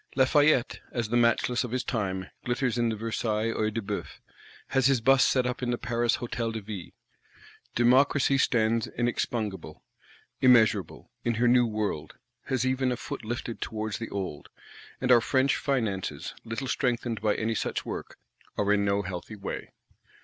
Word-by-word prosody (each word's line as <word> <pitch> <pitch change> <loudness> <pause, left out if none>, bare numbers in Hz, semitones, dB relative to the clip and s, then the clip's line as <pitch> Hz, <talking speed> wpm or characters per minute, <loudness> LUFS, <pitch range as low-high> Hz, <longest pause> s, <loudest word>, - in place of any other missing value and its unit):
Lafayette, 135 0 +3
as 120 -3 -2
the 120 - 0
matchless 120 +1 +2
of 125 - -4
his 125 +2 -1
time, 95 -6 -2 0.2
glitters 125 0 0
in 120 -1 +2
the 110 - -1
Versailles 110 0 -1
Œil 110 0 0
de 115 0 -3
Beouf; - - -5 0.5
has 135 -1 +3
his 135 -3 +3
Bust 135 +3 +5
set 130 -2 +2
up 125 +1 -2
in 125 - -1
the 120 - 0
Paris 120 0 0
Hôtel 115 -2 -3
de 110 - -3
Ville. 100 -4 -7 0.9
Democracy 135 +3 +4
stands 115 -2 +2
inexpugnable, 110 -7 -3 0.6
immeasurable, 120 -4 +3
in 120 -1 0
her 120 +2 +2
New 120 0 +5
World; 105 -8 -3 0.3
has 130 -1 0
even 130 0 +1
a 125 - -2
foot 125 - -6
lifted 115 +1 -5
towards 110 -1 -3
the 115 - -5
Old;—and 100 - -6
our 120 -2 +7
French 130 +3 +2
Finances, 110 -9 -2
little 115 +4 -4
strengthened 120 -4 -1
by 105 -1 +1 0.2
such - - -2
work, - - -6 0.4
are 105 0 +2
in 100 -1 +2
no 100 0 +1
healthy 90 +3 -6
way. 100 -1 -6
115 Hz, 160 wpm, -28 LUFS, 110-125 Hz, 0.9 s, our